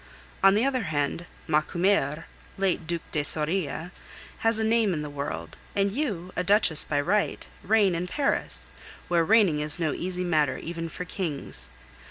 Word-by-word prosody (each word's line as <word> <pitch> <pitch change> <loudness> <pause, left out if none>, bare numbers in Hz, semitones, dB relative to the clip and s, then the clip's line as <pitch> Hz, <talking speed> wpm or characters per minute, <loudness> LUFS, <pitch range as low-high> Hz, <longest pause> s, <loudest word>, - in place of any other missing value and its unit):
On 195 0 +7
the 220 +5 +3
other 255 -5 0
hand, 155 +2 -1 0.2
Macumer, 160 0 +1 0.3
late 190 -4 0
Duc 170 -1 -2
de 150 - 0
Soria, 160 +2 -1 0.5
has 225 0 +2
a 220 - 0
name 220 -4 +2
in 150 - -3
the 150 - -6
world, 145 0 -5 0.2
and 200 0 +2
you, 195 - -3
a 180 - 0
duchess 195 -5 +4
by 145 - 0
right, 200 +8 0
reign 205 -2 +3
in 175 +2 -2
Paris, 280 +8 -1 0.4
where 170 -1 +3
reigning 195 -5 +4
is 150 0 +2
no 160 -3 0
easy 180 0 -3
matter 155 -6 +2
even 165 0 -5
for 180 - -6
kings. 145 - -4
175 Hz, 165 wpm, -27 LUFS, 155-200 Hz, 0.5 s, On